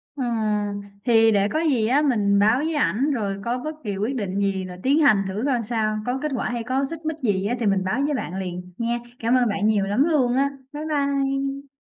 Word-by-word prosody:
Ừm, 215 -5 -1 0.2
thì 225 -2 +5
để 200 -1 +3
có 310 - 0
gì 270 -9 +2
á 270 +5 +3
mình 210 -8 +2
báo 215 +4 +4
với 315 +4 -1
ảnh 265 - +1
rồi 200 -7 -2
có 240 +1 0
bất 310 +5 -5
kỳ 205 -4 -3
quyết 220 +7 -1
định 200 -4 -2
gì 195 -2 0
là 180 -1 -8
tiến 280 +4 +3
hành 215 -10 +5
thử 195 +4 -3
coi 255 -4 +1
sao, 215 -1 -1
có 250 +2 -1
kết 305 - -2
quả - - -2
hay 240 -1 -3
có 260 +4 0
xích 330 -1 -8
mích 315 0 -2
gì 205 -9 0
á 235 +4 0
thì 235 - -1
mình 195 -2 +2
báo 190 +8 -1
với 295 - 0
bạn 190 -9 -3
liền, 180 -1 -5
nha. 235 +1 -1 0.2
Cảm 230 +2 +2
ơn 245 -2 +3
bạn 205 +1 0
nhiều 210 -3 +2
lắm 205 +7 +2
luôn 270 -7 +2
á. 275 +1 +2 0.2
Bye 295 +1 -5
bye. 275 -2 -1
235 Hz, 245 wpm, -23 LUFS, 205-275 Hz, 0.2 s, thì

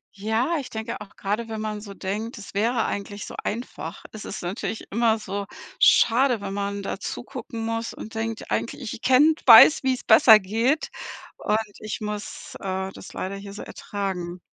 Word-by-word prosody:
Ja, 220 +11 0
ich 270 - -7
denke 220 0 -5
auch, 200 -1 -11
grade 215 +3 -2
wenn 220 -1 -4
man 215 -1 -4
so 200 -2 -9
denkt: 215 +6 -4
„Das 200 - -10
wäre 225 +3 +1
eigentlich 205 0 -4
so - - -9
einfach.“ 235 +4 -5
Es 215 - -8
ist 195 - -6
natürlich 190 +4 -4
immer 225 +1 +3
so 200 -1 -5 0.3
schade, 245 0 +5
wenn 200 -1 -5
man 200 0 -3
da - - -4
zugucken 230 -5 -6
muss 230 0 -3
und 220 - -9
denkt: 225 0 -4
„Eigentlich 280 +4 -2
ich 225 - -4
ich - - -9
kenne 280 +5 +5
weiß, 235 +5 +10
wie's 260 -2 0
besser 220 0 +8
geht, 230 +10 0 0.5
und 210 - +1 0.2
ich 215 -2 -5
muss, 210 -1 -6
äh, 190 0 -3
das - - -11
leider 195 +1 -4
hier 200 0 -9
so 205 - -7
ertragen.“ 185 -3 -5
215 Hz, 180 wpm, -24 LUFS, 200-230 Hz, 0.5 s, weiß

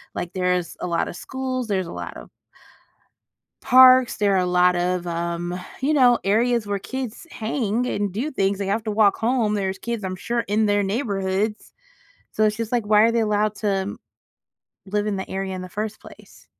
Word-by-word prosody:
Like, 175 - -4
there's 180 -2 -1
a - - -2
lot 170 -1 -1
of - - -8
schools, 260 -2 -4
there's 190 -4 -1
a - - -8
lot - - -7
of - - -12 1.3
parks, 255 -1 +6
there 205 -1 +2
are - - +3
a 180 - +2
lot 180 0 +3
of, 180 0 -1
um, 170 +1 -3 0.2
you 285 +3 +1
know, 250 -4 +5
areas 230 +2 +1
where 200 -1 -1
kids 260 - -6
hang 225 0 -1
and 205 -4 -1
do 235 +11 -2
things. 195 -5 0
They 200 - -2
have 210 +3 -1
to 215 - -2
walk 205 -1 +3
home, 230 -2 +1
there's 195 -2 -2
kids, 235 -3 -4
I'm 185 -1 -3
sure, 235 +5 -1
in 215 0 0
their 205 0 +2
neighborhoods, 200 -1 -2 0.6
so 215 - +1
it's 215 0 +1
just, 230 0 -4
like, 235 -4 0
why 210 0 +5
are 230 +1 +4
they 230 - +2
allowed 210 -1 +1
to 195 -2 -2 0.9
live 205 +2 -1
in 210 -2 -1
the 190 - -5
area 190 0 -3
in 185 - -5
the 185 - -8
first 215 +3 -5
place? - - -16
205 Hz, 200 wpm, -23 LUFS, 190-230 Hz, 1.3 s, parks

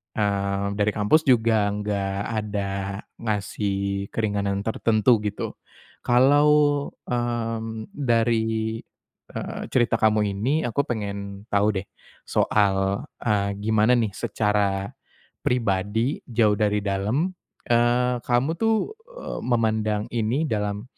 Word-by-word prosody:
eee, 100 -1 0
dari 105 +1 +3
kampus 105 +10 +3
juga 110 -4 +4
nggak 100 -2 -2 0.2
ada 100 -2 -3 0.5
ngasih 100 -2 -2
keringanan 100 -2 -1
tertentu 110 0 +3
gitu. 105 -1 -3 0.5
Kalau, 135 +5 +4 0.6
mmm, 115 -2 -3
dari, 115 -3 0 0.6
eee, - - -5
cerita 120 -2 +1
kamu 105 -2 +3
ini, 130 +11 0
aku 125 +4 -1
pengen 100 -3 -4
tahu 105 +1 +2
deh - - -32 0.4
soal, 100 +2 +1 0.2
eee, 100 -3 +1
gimana 110 +2 +2
nih 110 -5 +1
secara 105 -3 0 0.6
pribadi 115 +2 0
jauh 110 -4 +2
dari 105 -1 +1
dalam, 105 - 0 0.4
eee, 120 +1 +3
kamu 125 +3 +2
tuh, 225 - +1 0.2
eee, - - -5
memandang 110 -3 +1
ini 120 +6 0
dalam 105 -1 -1
110 Hz, 105 wpm, -24 LUFS, 100-120 Hz, 0.6 s, juga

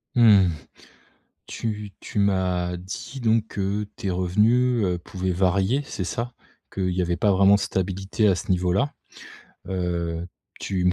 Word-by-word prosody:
Mmh, 105 -6 +6 1.0
tu 105 -3 -4
tu - - -4
m'as 90 -3 +1
dit 95 +9 -7
donc, 110 -2 +1
heu, 100 +2 -1
tes 100 -5 -3
revenus, 110 +7 +2
heu, 90 -1 0
pouvaient 95 +1 -3
varier, 95 +8 +2
c'est 95 - -4
ça? 120 +6 -4 0.4
Qu'il 95 -1 -1
y 90 +1 0
avait 85 -1 -1
pas 100 +4 +3
vraiment 100 +1 +5
stabilité 95 +3 -1
à 95 - +4
ce 95 - -3
niveau-là. 90 +9 +1 0.8
Heu, 85 -2 -2 0.3
tu 95 -2 -2
me 90 - +4
95 Hz, 145 wpm, -24 LUFS, 90-105 Hz, 1.0 s, Mmh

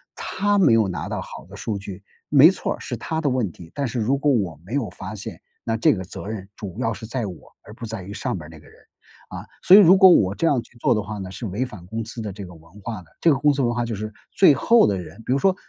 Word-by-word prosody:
他 205 +1 0
没 120 - +5
有 110 -3 +3
拿 90 - -5
到 - - -3
好 - - -9
的 100 - -12
数 105 +2 -4
据， 100 0 -8 0.3
没 150 +4 +7
错 - - -3
儿， - - -18
是 - - -5
他 160 -1 -3
的 155 - -1
问 120 -8 -1
题， 85 0 -14
但 140 -2 -2
是 120 0 -3
如 120 +5 +1
果 145 +1 +1
我 95 - -1
没 105 +9 -6
有 130 -7 0
发 95 +3 -8
现， 100 -4 -8 0.2
那 115 - -1
这 115 - +3
个 95 - -5
责 95 - -9
任 105 -3 -6
主 95 -4 -8
要 115 0 0
是 110 +2 -9
在 120 0 -3
我， 95 -4 -6 0.3
而 105 - -12
不 120 - -12
在 110 -4 -5
于 100 - -8
上 100 - -3
边 75 - -9
儿 75 - -12
那 80 -2 -13
个 75 - -19
人。 - - -20 0.5
啊， - - -7 0.2
所 185 - +8
以 210 - +10
如 190 0 +7
果 190 - +8
我 100 - +4
这 - - -1
样 140 -7 +2
去 120 - -20
做 120 - +2
的 105 - 0
话 105 +1 -6
呢， 95 -1 -7
是 105 +3 -6
违 105 +8 -2
反 105 -8 -11
公 110 +2 -4
司 115 0 -6
的 105 -2 -5
这 100 +1 -8
个 90 - -12
文 85 +5 -17
化 110 -2 -6
的， 85 - -20
这 165 - +5
个 - - +3
公 150 +1 +4
司 140 -1 0
文 120 -1 +1
化 120 - -1
就 115 - -4
是 110 +1 -6 0.2
最 185 -7 +6
后 230 - +4
的 100 - +1
人 90 - -10
比 - - -2
如 135 - +1
说 190 +4 +3
110 Hz, 325 characters per minute, -22 LUFS, 95-135 Hz, 0.5 s, 以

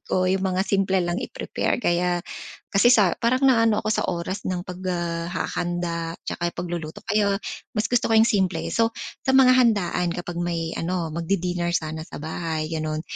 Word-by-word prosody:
ko, 185 - +1
'yong 190 +1 +1
mga 185 0 +1
simple 195 -1 +1
lang 175 +1 -1
i-prepare. - - -2
Kaya 175 0 +1 0.5
kasi 200 +4 +4
sa 210 -8 +5
parang 255 +3 +1
naano 230 -5 +4
ako - - -2
sa - - +1
oras 185 +4 -3
ng 180 -1 -2
pag, 180 -2 -7
ah, 170 -1 -2
hahanda 175 -2 -2
'tsaka 175 0 -2
pagluluto, 175 +1 -5
kaya 205 -1 +2 0.4
mas 215 +1 +1
gusto 245 0 +2
ko 225 - +2
'yong 220 - +7
simple. 190 -3 +1
So, 230 0 +1 0.3
sa 265 - +3
mga 260 -1 +7
handaan 205 -7 +2
kapag 175 -1 -5
may 165 -1 -2
ano, 170 -1 -2
magdi-dinner 175 0 -1
sana 155 0 -2
sa - - -10
bahay, 160 0 -3
gano'n, 155 -1 -2
180 Hz, 175 wpm, -24 LUFS, 170-205 Hz, 0.5 s, yong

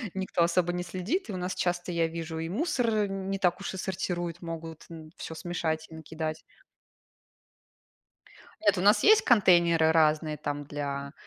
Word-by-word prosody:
Никто 190 -2 -1
особо 175 +1 +1
не 180 0 -2
следит. 185 - -3
И 205 - -4
у - - -3
нас 180 +1 -3
часто, 175 0 -1
я 170 -1 +1
вижу, 165 0 -5
и 165 0 -3
мусор 230 - 0
не 195 0 -3
так 180 -2 +1
уж 200 - -4
и - - -6
сортируют, 175 -2 -3
могут 165 -2 -7
н 160 -2 -10
всё 160 - -7
смешать 160 -2 -3
и 160 - -11
накидать. 160 0 -5 2.2
Нет, 205 -2 +3
у - - 0
нас 205 +3 +5
есть 435 +1 +7
контейнеры 170 -7 +5
разные 155 -1 +2
там 145 0 -4
для, 140 -1 -4
170 Hz, 165 wpm, -28 LUFS, 160-190 Hz, 2.2 s, есть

